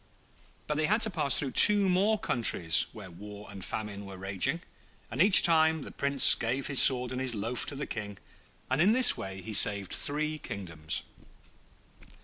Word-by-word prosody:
But 150 - -4
they 155 0 -1
had 215 +3 0
to 220 - +2
pass 155 -5 0
through 135 -3 -4
two 205 +5 +4
more 195 +4 0
countries 115 - 0
where 100 -4 -13
war 105 +4 -13
and 100 -2 -11
famine 100 +1 -7
were 100 -1 -12
raging, 95 - -2 0.5
and - - -3
each 195 +1 +5
time 160 -2 +1
the - - -11
Prince 140 -1 +4
gave 130 +4 -4
his 140 -2 +4
sword 125 -1 +4
and 130 0 -5
his 130 -3 -1
loaf 115 +4 -5
to 145 - -7
the 140 - -6
King, 100 -2 -8 0.5
and 130 +3 -2
in 200 +5 +2
this 255 0 +5
way 95 -1 -9
he 110 - -8
saved 100 -3 +2
three 155 +1 0
kingdoms. 80 - -6
130 Hz, 180 wpm, -27 LUFS, 100-160 Hz, 0.5 s, each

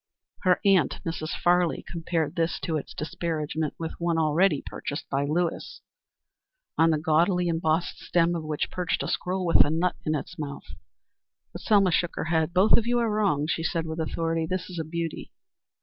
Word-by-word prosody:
Her 185 -2 +3
aunt, 190 -8 +3
Mrs. 165 -1 -3
Farley, 175 -1 +2
compared 165 -2 -2
this 165 0 0
to 160 - -2
its 150 - -5
disparagement 155 -1 -3
with 160 -1 -4
one 170 -1 0
already 160 0 +2
purchased 145 - -5
by 140 +1 +1
Lewis, 165 +3 -2 0.9
on 165 0 +4
the 155 - +2
gaudily 175 +3 +2
embossed 165 0 0
stem 170 0 +1
of 165 - -3
which 155 -1 -2
perched 180 -2 -1
a - - -3
squirrel 185 +1 -2
with 170 - +6
a - - -2
nut 170 +3 0
in 155 -1 0
its 170 +4 -6
mouth. 145 -2 -6 0.9
But - - -7
Selma 200 -4 +4
shook 175 +1 0
her - - -3
head. 160 0 +2
"Both 185 +4 +5
of 235 - 0
you 240 0 +2
are 230 -2 +1
wrong," 200 -9 +1
she 160 +1 -1
said 165 0 -1
with 160 0 -5
authority. 165 0 -1
"This 185 +1 -3
is 175 - -5
a - - -1
beauty." 165 0 -4
165 Hz, 185 wpm, -26 LUFS, 155-180 Hz, 0.9 s, with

